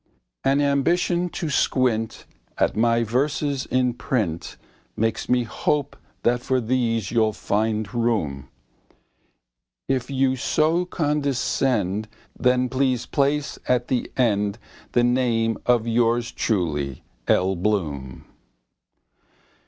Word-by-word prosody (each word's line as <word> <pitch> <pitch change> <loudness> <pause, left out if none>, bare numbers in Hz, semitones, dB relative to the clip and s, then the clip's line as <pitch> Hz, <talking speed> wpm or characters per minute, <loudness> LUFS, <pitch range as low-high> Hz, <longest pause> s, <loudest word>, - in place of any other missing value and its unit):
An 135 +1 +3
ambition 170 +5 +1
to 165 -2 -4
squint 120 -5 +1 0.3
At - - +1
my 115 +1 +3
verses 140 +3 -1
in 125 -1 +1
print 105 -10 -2 0.4
Makes 115 +1 -1
me 125 -1 +3
hope 145 +5 -1 0.3
that 120 +1 +2
for 130 +1 +1
these 115 -3 0
you'll 110 -2 +2
find 110 +1 -1
room. 105 - -1 1.4
If 130 -2 -1
you 135 -1 +2
so 160 +7 +1
condescend 135 - 0 0.3
Then 125 0 +2
please 130 -1 0
place 145 +1 0
at 125 -1 +1
the 125 - -1
end 105 -4 +1 0.4
The 120 - +4
name 120 -2 +1
of 120 -2 +3
yours 115 0 +1
truly, 75 - -1 0.2
L. 95 +1 +3
Bloom. 80 -10 -2
120 Hz, 105 wpm, -23 LUFS, 110-135 Hz, 1.4 s, The